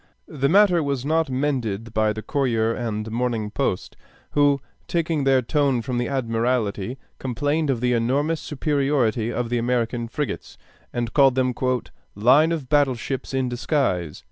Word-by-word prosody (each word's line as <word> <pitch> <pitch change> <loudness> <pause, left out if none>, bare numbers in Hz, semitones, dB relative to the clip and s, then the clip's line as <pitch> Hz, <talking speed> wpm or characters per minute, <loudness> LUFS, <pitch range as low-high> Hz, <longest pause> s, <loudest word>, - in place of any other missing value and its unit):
The 140 -3 -1
matter 185 -1 +5
was 140 -3 -2
not 160 0 +1
mended 120 -6 -2
by 110 -1 +2
the 110 0 -5
Courier 115 -6 +1
and 110 -2 -3
Morning 115 -3 -1
Post, 125 -7 -2 0.4
who, 145 -1 +3 0.3
taking 165 -4 0
their 135 -1 +4
tone 135 -2 +1
from 120 0 -2
the 120 - -1
Admiralty, 115 -3 -1 0.2
complained 145 +5 -1
of 125 -4 0
the 125 0 +2
enormous 140 +7 +1
superiority 135 -6 0
of 120 -1 -2
the 120 0 0
American 120 0 -1
frigates, 145 +5 -4 0.3
and 120 -1 -3
called 135 -3 +5
them 130 -1 +1 0.6
"line 130 +10 +5
of 155 -6 -3
battle 145 -3 +3
ships 130 +3 -5
in 130 -1 0
disguise." 120 - -1
130 Hz, 150 wpm, -23 LUFS, 115-145 Hz, 0.6 s, matter